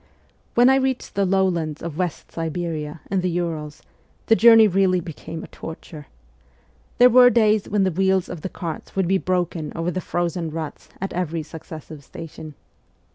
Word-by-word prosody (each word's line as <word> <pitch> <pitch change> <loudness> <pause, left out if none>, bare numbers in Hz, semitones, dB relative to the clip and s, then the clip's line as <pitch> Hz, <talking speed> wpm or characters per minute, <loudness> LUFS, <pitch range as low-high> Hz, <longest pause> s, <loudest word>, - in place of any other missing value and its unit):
' - - -39
When 240 +1 +6
I 265 +1 +5
reached 265 -1 -1
the 200 -1 +1
lowlands 175 -5 0
of 165 -3 -5
West 180 -4 -3
Siberia 160 -2 -4
and 190 -2 +1
the 180 - 0
Urals 165 -4 -4 0.4
the 225 - +5
journey 225 -1 +7
really 185 -1 +2
became 165 0 -8
a - - -9
torture. 160 -2 -10 0.9
There 245 - +8
were 250 0 +7
days 215 -3 +2
when 205 -1 +2
the 190 - +1
wheels 190 +1 +1
of 175 -3 -7
the 190 - -4
carts 165 -3 -7
would 190 -2 +1
be 190 +1 +2
broken 175 -4 -2
over 165 +2 -1
the 185 - -3
frozen 175 -2 -2
ruts 160 -1 -7
at 195 - -4
every 170 -2 -2
successive 155 -1 -10
station. 155 0 -10
175 Hz, 175 wpm, -22 LUFS, 160-195 Hz, 0.9 s, There